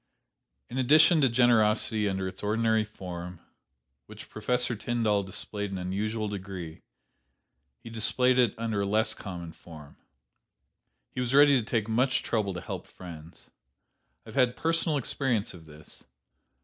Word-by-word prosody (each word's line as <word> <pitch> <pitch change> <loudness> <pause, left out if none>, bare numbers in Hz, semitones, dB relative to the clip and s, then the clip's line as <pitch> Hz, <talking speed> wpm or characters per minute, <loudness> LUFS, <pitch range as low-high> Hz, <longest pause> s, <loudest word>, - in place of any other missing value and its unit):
In 125 - -4
addition 155 +5 +5
to 135 - +4
generosity 110 -3 +3
under 95 -1 -2
its 95 - -7
ordinary 110 +1 +1
form, 90 -4 -8 0.7
which - - -12
Professor 120 +3 0
Tyndall 110 -2 0
displayed 100 +2 -4
in 95 - -5
unusual 105 +4 -2
degree, 95 -5 -7 1.0
he 115 - -9
displayed 125 +3 +2
it 120 -4 +3
under 110 -3 -2
a - - 0
less 110 +2 +1
common 85 -4 -8
form. 75 -4 -14 1.1
"He - - -6
was 125 +1 0
ready 145 -2 +7
to - - -4
take 110 -1 -1
much 125 +3 +1
trouble 105 -5 -1
to 90 - -5
help - - -7
friends. 85 -2 -12 0.7
I - - -12
have 110 - -11
had 125 -2 +2
personal 165 -1 +1
experience 125 -4 -1
of 85 -3 -13
this. 75 0 -12
110 Hz, 145 wpm, -28 LUFS, 95-125 Hz, 1.1 s, ready